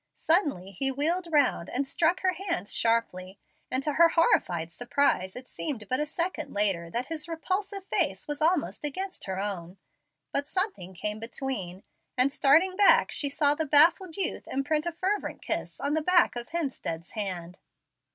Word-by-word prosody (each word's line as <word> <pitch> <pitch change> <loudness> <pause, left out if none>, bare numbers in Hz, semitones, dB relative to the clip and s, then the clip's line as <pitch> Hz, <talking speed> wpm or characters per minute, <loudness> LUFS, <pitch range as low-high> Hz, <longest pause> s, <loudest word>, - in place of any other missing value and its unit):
Suddenly 290 - +1
he 270 +8 0
wheeled 330 +7 0
round 285 - +2
and 275 +3 -1
struck 335 +5 +1
her 370 -1 +2
hands 345 - -3
sharply; 200 -5 0 0.3
and 260 +1 -1
to 300 - -1
her 335 +3 +6
horrified 175 - +2
surprise 245 -5 0
it 255 0 -9
seemed 245 -10 -5
but 255 - -1
a 300 - -1
second 335 - -4
later 190 -5 +1
that 240 +8 -2
his 315 +1 -5
repulsive 380 +4 -3
face - - -1
was 295 0 -4
almost 325 -1 +1
against 375 +6 -4
her 190 -1 -4
own. 190 -3 -5 0.5
But 285 +1 -1
something 370 - -3
came 210 +4 -3
between, 225 -6 -4 0.3
and, 255 +2 +3
starting 320 +8 +4
back, 405 0 +5
she 285 - +1
saw 285 0 +2
the 315 +1 -2
baffled 325 +4 +5
youth 390 - -2
imprint 300 +4 -1
a - - 0
fervent 380 +5 -3
kiss - - -2
on 285 +1 -1
the 315 - +1
back 355 -3 +3
of 240 0 -6
Hemstead's 265 - -4
hand. 185 -4 -4
285 Hz, 170 wpm, -28 LUFS, 210-335 Hz, 0.5 s, her